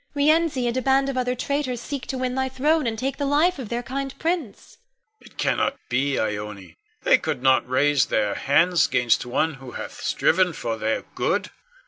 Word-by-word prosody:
Rienzi, 300 -2 +2
and 240 0 -1
a 260 - 0
band 270 +1 +2
of 275 - -3
other 250 0 0
traitors, 260 -1 -2
seek 275 +1 -6
to 265 - -3
win 255 -1 -2
thy 265 0 -1
throne 295 +2 +1
and 225 -1 -2
take 270 +4 -2
the 285 - -1
life 300 +4 +2
of 240 -6 -6
their 240 +1 -2
kind 270 +2 -5
prince. 325 - -4 0.4
Con. - - -17
It - - -27
cannot 275 - 0
be, 135 +2 +1
Ione! 105 -5 -4 0.3
They - - +5
could 125 - -3
not 130 -1 +3
raise 145 +1 +3
their 105 -2 +1
hands 170 +5 +3
'gainst 120 0 +1
one 155 +6 0
who 130 -2 -10
hath - - -7
striven 180 0 +2
for 115 -6 -3
their 110 0 -1
good. - - -1
245 Hz, 195 wpm, -24 LUFS, -, 0.4 s, They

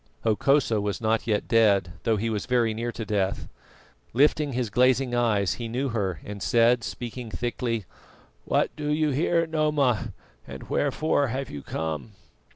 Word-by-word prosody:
Hokosa 115 0 +2
was 100 -2 -2
not 110 0 0
yet 105 -2 0
dead, 100 -6 +3
though 110 -1 +2
he 115 +3 -1
was 105 -2 -3
very 120 -3 +2
near 115 +2 -3
to 115 -1 -6
death. 100 -2 -1 0.7
Lifting 145 +2 +3
his 120 -3 -2
glazing 125 +2 +3
eyes, 110 -5 +2
he 115 - -3
knew 130 +4 -2
her 95 - -2
and 100 -1 -7
said, 120 +1 +3
speaking 120 0 -6
thickly: 115 -2 -2 0.6
"What - - 0
do 150 -1 -4
you 150 0 +1
here, 165 +4 +2
Noma, 150 -7 +1 0.4
and - - -9
wherefore 145 0 +1
have 130 +2 -4
you 70 - -6
come?" 80 +9 -4
115 Hz, 160 wpm, -26 LUFS, 105-135 Hz, 0.7 s, dead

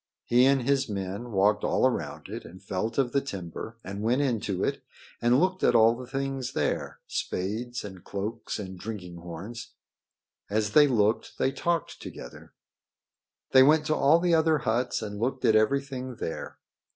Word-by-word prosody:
He 125 +2 +5
and 135 -2 +3
his 135 -1 +1
men 100 +4 -4
walked 105 +1 +3
all - - +2
around 130 - -2
it - - -6
and 90 +2 -12
felt 100 +3 -3
of 130 -3 +2
the 140 - +2
timber 100 -1 -7
and 100 +2 -6
went 120 +6 +2
into 105 -7 -1
it - - -1 0.4
and 120 +2 +4
looked 185 +2 +1
at - - +4
all 115 0 +6
the 125 +1 -9
things 135 -1 -3
there 75 - -1
spades 115 +6 -3
and 95 -3 -9
cloaks 105 +4 -4
and 95 -3 -7
drinking 90 -5 -7
horns. 90 +7 -8 0.7
As 105 0 0
they 150 +5 +7
looked 110 -4 +1
they 135 - +1
talked 170 +2 -2
together. 60 - -10 1.0
They 130 - +8
went 150 +3 +5
to 155 - +1
all 145 +4 +5
the 175 0 +1
other 160 -1 +4
huts 120 -2 -1
and 105 -1 -5
looked 130 +3 -1
at 110 - +5
everything 130 +2 0
there. 80 - -5
115 Hz, 170 wpm, -27 LUFS, 100-135 Hz, 1.0 s, They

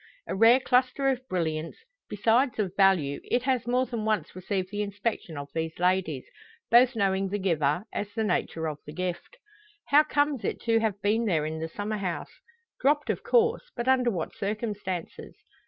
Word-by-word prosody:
A - - -4
rare 225 +5 +6
cluster 260 +1 +2
of 260 -2 0
brilliants, 160 -4 -2 0.3
besides 225 +4 +2
of 195 -4 -2
value, 185 -8 +3
it 245 - 0
has 255 -3 0
more 250 +1 +2
than 235 -4 -4
once 215 -4 -1
received 185 0 -3
the 205 0 -2
inspection 200 -5 -3
of 145 0 -6
these 160 0 -3
ladies 180 -6 0 0.5
both 245 +1 +6
knowing 195 -2 +1
the 205 - -1
giver, 165 -4 +1
as 205 0 -3
the 225 - 0
nature 165 -5 -1
of 150 -1 -5
the 150 - -7
gift. 180 - -4 0.5
How 290 +2 +7
comes 290 -4 0
it - - -2
to 225 -1 +2
have 215 -3 -1
been 220 +3 +2
there 160 -7 +1
in 160 +1 -4
the 160 0 -4
summer 210 +5 -3
house? 180 - -4 0.5
Dropped, 295 +2 +2
of - - -4
course; 475 +1 +2
but 240 0 -3
under 255 -2 +4
what 175 -8 -3
circumstances? 205 -4 -4
205 Hz, 180 wpm, -27 LUFS, 180-240 Hz, 0.5 s, How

